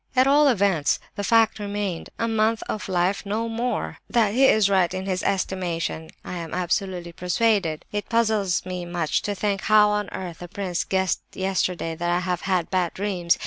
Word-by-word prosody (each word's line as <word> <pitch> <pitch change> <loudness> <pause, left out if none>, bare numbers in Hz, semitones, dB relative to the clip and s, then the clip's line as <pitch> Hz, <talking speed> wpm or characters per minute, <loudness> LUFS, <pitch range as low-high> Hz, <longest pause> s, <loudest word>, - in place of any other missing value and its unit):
"At 255 0 +5
all 290 +2 +5
events, 195 - +2 0.2
the 205 - -3
fact 225 0 +3
remained—a 205 +1 -3
month 220 0 +1
of 210 -2 -4
life 185 +2 +1
and 200 - -11
no 225 +3 -1
more! 230 +1 -2
That 225 -4 +2
he 265 +3 +5
is 215 -5 +4
right 190 -3 +3
in 185 0 -4
his 185 -2 -1
estimation 175 -4 -2 0.2
I 180 - -5
am 165 -1 -5
absolutely 180 -1 -1
persuaded. 180 -2 0
"It 205 0 -4
puzzles 215 -6 +1
me 180 -1 -4
much 175 -2 -1
to 205 - -3
think 200 0 -1
how 210 0 +5
on 210 -2 -1
earth 175 -3 -6
the 175 - -7
prince 180 -1 -3
guessed 190 -2 0
yesterday 185 -3 -1
that 175 +2 -2
I 175 +1 +1
have 180 -1 -2
had 180 -2 +1
bad 180 -3 0
dreams. 185 -4 0
190 Hz, 185 wpm, -24 LUFS, 175-210 Hz, 0.2 s, At